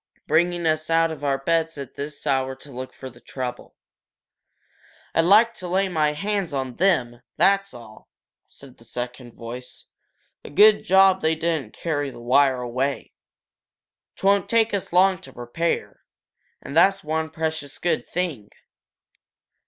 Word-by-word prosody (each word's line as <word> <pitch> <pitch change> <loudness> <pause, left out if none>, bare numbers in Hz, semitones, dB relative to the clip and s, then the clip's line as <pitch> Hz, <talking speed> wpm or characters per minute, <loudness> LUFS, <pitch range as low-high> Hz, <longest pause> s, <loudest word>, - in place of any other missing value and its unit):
Bringing 175 +2 +1
us 155 0 0
out 165 0 +3
of 155 - -8
our 140 -1 +1
beds 165 +3 0
at 140 -2 -8
this 145 +1 -6
hour 130 -1 0
to 140 +2 -14
look 130 0 -7
for 130 - -10
trouble!" 125 -1 -7 1.4
"I'd 165 - +3
like 220 +5 +5
to 185 - -8
lay 190 +2 +1
my 155 -4 +1
hands 195 +1 -2
on 130 -3 -3
them, 130 -11 +1 0.2
that's 195 0 +3
all!" 110 -2 -14 0.4
said 135 -2 -15
the - - -17
second 120 +1 -7
voice. 125 +2 -9 0.6
"A - - -9
good 210 +8 +5
job 190 0 +5
they 160 +1 +2
didn't 160 -8 -2
carry 145 -4 -2
the 130 - -11
wire 130 +1 +3
away 130 +3 -3 1.0
'twon't 200 -1 +2
take 225 -1 +2
us 200 - -3
long 185 +1 +4
to 135 - -13
repair, 125 +8 -3 0.6
and 140 - -7
that's 195 +3 +4
one 160 +1 -2
precious 160 -3 -4
good 170 -3 -1
thing!" 160 - -3
155 Hz, 145 wpm, -23 LUFS, 130-180 Hz, 1.4 s, like